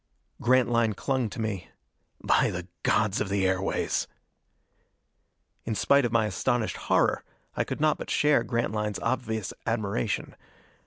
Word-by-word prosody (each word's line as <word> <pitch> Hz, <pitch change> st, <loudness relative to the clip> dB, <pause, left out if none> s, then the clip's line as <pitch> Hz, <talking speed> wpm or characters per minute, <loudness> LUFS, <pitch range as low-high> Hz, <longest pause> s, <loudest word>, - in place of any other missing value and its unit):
Grantline 120 Hz, -3 st, +3 dB
clung 130 Hz, +2 st, -1 dB
to 100 Hz, -, -8 dB
me. 105 Hz, -5 st, -3 dB, 0.5 s
"By -, -, +3 dB
the 90 Hz, 0 st, -5 dB
gods 105 Hz, -2 st, +2 dB
of 105 Hz, -, -1 dB
the 100 Hz, -1 st, +1 dB
airways!" 95 Hz, +1 st, 0 dB, 1.6 s
In 110 Hz, -, -2 dB
spite 140 Hz, +4 st, +4 dB
of 120 Hz, -, -1 dB
my 115 Hz, -2 st, +3 dB
astonished 110 Hz, +3 st, -1 dB
horror -, -, +1 dB, 0.3 s
I -, -, +1 dB
could -, -, -5 dB
not 155 Hz, 0 st, +2 dB
but -, -, -6 dB
share 150 Hz, -5 st, +3 dB
Grantline's 110 Hz, -3 st, -1 dB
obvious 110 Hz, -4 st, -2 dB
admiration. 110 Hz, -1 st, -1 dB
110 Hz, 135 wpm, -27 LUFS, 100-120 Hz, 1.6 s, spite